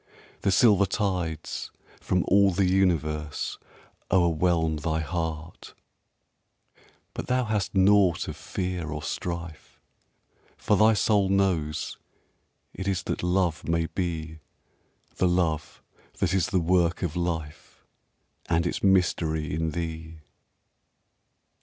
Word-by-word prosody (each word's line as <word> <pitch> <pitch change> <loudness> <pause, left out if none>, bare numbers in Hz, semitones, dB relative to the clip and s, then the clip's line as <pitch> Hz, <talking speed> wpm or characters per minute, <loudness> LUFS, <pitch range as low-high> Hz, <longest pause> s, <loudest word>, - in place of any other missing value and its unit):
The - - +1
silver 100 -2 +5
tides 90 -6 -2 0.3
from 90 -1 0
all 100 +1 +5
the 95 +1 +1
universe 80 -5 0 0.5
o'erwhelm 85 -2 +2
Thy 80 +1 -1
heart, 80 0 -5 1.4
but - - -6
thou 125 0 +1
hast 105 -3 -2
naught 95 -2 +4
of - - -5
fear 90 -3 -4
or 75 0 -5
strife, 85 -3 -6 0.8
For 105 - +1
thy 110 +2 +5
soul 100 -2 +2
knows 90 -6 0 0.7
it 95 - -6
is 95 -1 0
that - - -3
love 90 -3 0
may 85 0 +1
be, 80 -3 -4 0.8
The 90 - +3
love 85 -4 -1 0.3
that 95 -2 0
is 95 -3 +2
the 95 - +1
work 85 +1 +1
of 85 -2 -2
life 80 -3 -4 0.6
And 85 0 +2
its 85 - -2
mystery 80 -5 +1
in 80 +1 -1
thee. 80 0 -5
85 Hz, 115 wpm, -26 LUFS, 80-95 Hz, 1.4 s, silver